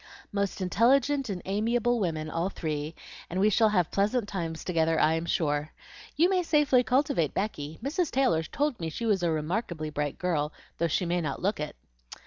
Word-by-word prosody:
"Most 200 -1 -2
intelligent 265 +7 +3
and 185 -3 -4
amiable 230 +4 +1
women 160 -5 -1
all 165 +4 -1
three, 155 -3 -4 0.3
and 180 - -2
we 210 +2 +4
shall 220 +2 +4
have 180 -6 +1
pleasant 205 +3 +1
times 165 -5 -4
together, 165 -2 +1
I 155 - +4
am 165 +1 -2
sure. 150 -2 0 0.4
You 330 +5 +5
may 370 -1 +2
safely 295 -6 +3
cultivate 245 - +1
Becky; 160 -7 -3
Mrs. 310 +4 0
Taylor 255 -11 +2
told 280 - -2
me 165 - -3
she 230 +9 -4
was 205 -4 +2
a 175 - +1
remarkably 160 0 -2
bright 145 -1 -2
girl, 155 -5 -1 0.3
though 170 - +2
she 180 +3 0
may 175 +1 0
not 150 -1 -4
look 200 -1 0
it." 150 0 -4
185 Hz, 185 wpm, -28 LUFS, 160-235 Hz, 0.4 s, You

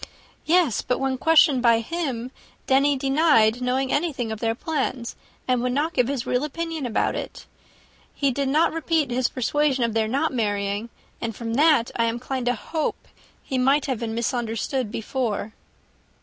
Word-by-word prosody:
"Yes; 330 - +3
but 250 - -1
when 265 -1 -1
questioned 310 -4 +5
by 235 -2 +5
him, 255 -3 -3 0.3
Denny 275 +1 +3
denied 270 -5 +3
knowing 260 +1 0
anything 285 -7 -1
of 220 - -5
their 225 0 0
plan, 265 -4 -2 0.4
and 250 -2 +2
would 250 0 -1
not 305 +5 0
give 250 - +2
his 270 -3 -2
real 250 +2 0
opinion 320 -2 -3
about 230 - 0
it. - - -6 0.7
He 280 -2 +1
did 275 +1 -1
not 310 +4 +3
repeat 320 -4 0
his 250 0 +1
persuasion 270 +1 0
of 230 -2 0
their 220 -1 +1
not 275 +6 0
marrying, 205 -1 -1 0.3
and 225 -2 -3
from 230 0 -4
that 290 -3 +4
I 230 - +2
am 230 0 0
inclined 255 +1 -4
to 245 - +2
hope 315 +7 -4 0.3
he 260 -2 -2
might 275 +3 +3
have 260 -6 -2
been 225 -1 -3
misunderstood 235 0 -2
before." 220 -2 -3
255 Hz, 170 wpm, -24 LUFS, 230-290 Hz, 0.7 s, questioned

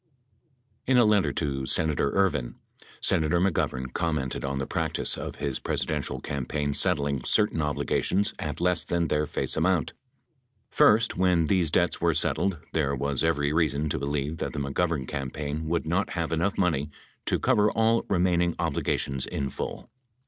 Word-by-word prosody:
32 - - 0
In 130 - +5
a 120 - +6
letter 105 -2 +3
to 70 -4 -2
Senator 80 -3 +2
Ervin, 95 -11 +1 0.5
Senator 80 +2 +2
McGovern 65 -8 -1
commented 75 -6 -2
on 70 0 -2
the 70 - -2
practice - - -1
of - - -6
his 70 -2 -3
Presidential - - -2
campaign 70 +1 -3
settling 70 -2 +1
certain 105 -6 +2
obligations 85 +6 0
at 75 -2 -4
less 90 -3 +2
than 85 +1 -1
their 75 0 +1
face - - 0
amount: 85 -2 +1 0.8
First, 110 +2 +4
when 90 -3 +3
these 90 -1 +2
debts 85 +2 +1
were - - +2
settled, 95 -3 0 0.2
there 70 -3 +1
was 70 0 0
every 75 0 +1
reason 75 -2 +1
to - - -1
believe 70 +3 -2
that - - -3
the - - -3
McGovern 70 0 -1
campaign 75 +2 -4
would 85 +1 -1
not 90 +5 0
have 85 -2 -2
enough 85 +5 0
money 75 -6 +1 0.4
to - - +2
cover 110 -5 +3
all 115 +1 +2
remaining 90 -2 +2
obligations 70 -1 -1
in 70 -2 -3
full. - - -6
80 Hz, 160 wpm, -27 LUFS, 70-90 Hz, 0.8 s, a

